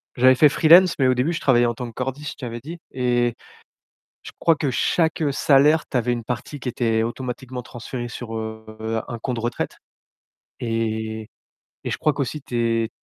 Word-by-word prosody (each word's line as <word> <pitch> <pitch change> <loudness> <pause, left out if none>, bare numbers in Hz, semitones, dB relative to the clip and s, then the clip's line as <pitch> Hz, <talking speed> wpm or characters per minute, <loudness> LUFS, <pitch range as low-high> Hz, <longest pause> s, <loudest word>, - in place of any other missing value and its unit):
j'avais 130 +1 +6
fait 150 +4 +7
freelance, 170 +5 +6
mais 130 - +4
au 130 - +4
début, 130 +7 0
je 160 - -4
travaillais 120 -3 +4
en 120 - +1
tant 120 +1 -6
que 115 - -10
cordiste, 135 +4 -4
je - - -23
t'avais 120 0 -5
dit. 165 +7 -8
Et, 120 -1 +1 0.9
je - - -9
crois 165 - +4
que 145 -1 0
chaque, 160 +6 +1
heu, 145 -3 +2
salaire, 145 +3 +4
tu - - -7
avais 125 0 +1
une 120 -2 -3
partie 125 +4 -4
qui 130 - -7
était 115 -2 +1
automatiquement 125 +1 -5
transférée 120 +1 -6
sur, 115 -1 -6
heu, 110 0 -4
un 120 - -5
compte 120 0 -3
retraite. 120 +2 -3 0.8
Et 110 -1 -2
et 110 - -13 0.5
et - - -3
je - - -2
crois 155 - +2
qu'aussi 140 +2 -3
tes 115 -3 0
125 Hz, 195 wpm, -23 LUFS, 115-135 Hz, 0.9 s, fait